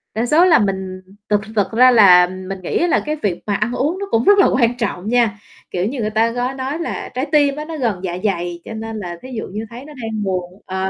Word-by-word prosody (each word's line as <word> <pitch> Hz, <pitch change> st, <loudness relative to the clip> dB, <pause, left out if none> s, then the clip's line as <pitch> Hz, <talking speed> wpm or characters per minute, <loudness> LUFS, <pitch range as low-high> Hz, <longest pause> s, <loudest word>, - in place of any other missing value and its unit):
Đa 225 Hz, +2 st, 0 dB
số 315 Hz, +8 st, +4 dB
là 350 Hz, -, +5 dB
mình 190 Hz, -2 st, -2 dB, 0.3 s
thực- 210 Hz, -1 st, +2 dB
thực 205 Hz, -1 st, +1 dB
ra 255 Hz, +3 st, +6 dB
là 180 Hz, -6 st, +7 dB
mình 185 Hz, +1 st, -7 dB
nghĩ 180 Hz, -, -2 dB
á 350 Hz, -, +2 dB
là -, -, +2 dB
cái 305 Hz, 0 st, -1 dB
việc 200 Hz, -, -3 dB
mà 205 Hz, -, +1 dB
ăn 215 Hz, +4 st, -1 dB
uống 315 Hz, +9 st, -1 dB
nó 400 Hz, -, -3 dB
cũng 225 Hz, +1 st, +2 dB
rất 405 Hz, +5 st, +5 dB
là 390 Hz, -, +6 dB
quan 245 Hz, -1 st, +1 dB
trọng 205 Hz, -5 st, -3 dB
nha, 235 Hz, -4 st, +2 dB, 0.4 s
kiểu 180 Hz, 0 st, -1 dB
như, 250 Hz, +5 st, -3 dB
người 215 Hz, -, -1 dB
ta 220 Hz, +2 st, +2 dB
gói 245 Hz, +2 st, -2 dB
nói 270 Hz, +4 st, -4 dB
là 340 Hz, -, -4 dB
trái 260 Hz, -, -1 dB
tim 290 Hz, -2 st, +3 dB
á, 300 Hz, +1 st, -5 dB
nó 325 Hz, -1 st, -6 dB
gần 230 Hz, -9 st, -1 dB
dạ 175 Hz, -1 st, -3 dB
dày, 175 Hz, -3 st, -2 dB
cho -, -, -7 dB
nên 220 Hz, 0 st, -6 dB
là 175 Hz, -4 st, -6 dB
thí 260 Hz, -, -10 dB
dụ -, -, -4 dB
như 215 Hz, +4 st, -6 dB
thấy 240 Hz, +4 st, -10 dB
nó 300 Hz, -, -11 dB
đang 220 Hz, -2 st, -3 dB
buồn 185 Hz, 0 st, -4 dB
ờ. 190 Hz, 0 st, -2 dB
220 Hz, 270 wpm, -19 LUFS, 190-260 Hz, 0.4 s, là